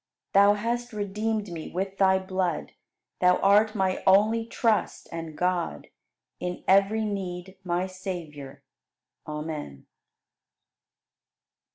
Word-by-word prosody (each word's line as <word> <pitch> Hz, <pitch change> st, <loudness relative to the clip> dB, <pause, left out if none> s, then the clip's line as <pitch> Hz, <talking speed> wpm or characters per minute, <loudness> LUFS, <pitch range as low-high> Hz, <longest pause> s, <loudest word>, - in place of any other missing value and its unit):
Thou 200 Hz, +1 st, +6 dB
hast 235 Hz, +3 st, -2 dB
redeemed 210 Hz, 0 st, -2 dB
me 165 Hz, -2 st, -6 dB
with 190 Hz, +2 st, -4 dB
Thy 190 Hz, -1 st, +5 dB
blood, 185 Hz, -3 st, -2 dB, 0.5 s
Thou 180 Hz, 0 st, +5 dB
art 210 Hz, +3 st, +4 dB
my 190 Hz, -2 st, 0 dB
only 215 Hz, +4 st, +4 dB
Trust 225 Hz, -2 st, 0 dB
and 165 Hz, -2 st, -6 dB
God 180 Hz, -, -1 dB, 0.5 s
In 180 Hz, 0 st, -4 dB
every 200 Hz, +3 st, +4 dB
need, 190 Hz, -2 st, -5 dB
my 180 Hz, 0 st, 0 dB
Savior. 160 Hz, -7 st, -7 dB, 0.6 s
Amen. 150 Hz, -, -6 dB
190 Hz, 100 wpm, -27 LUFS, 175-205 Hz, 0.6 s, Thou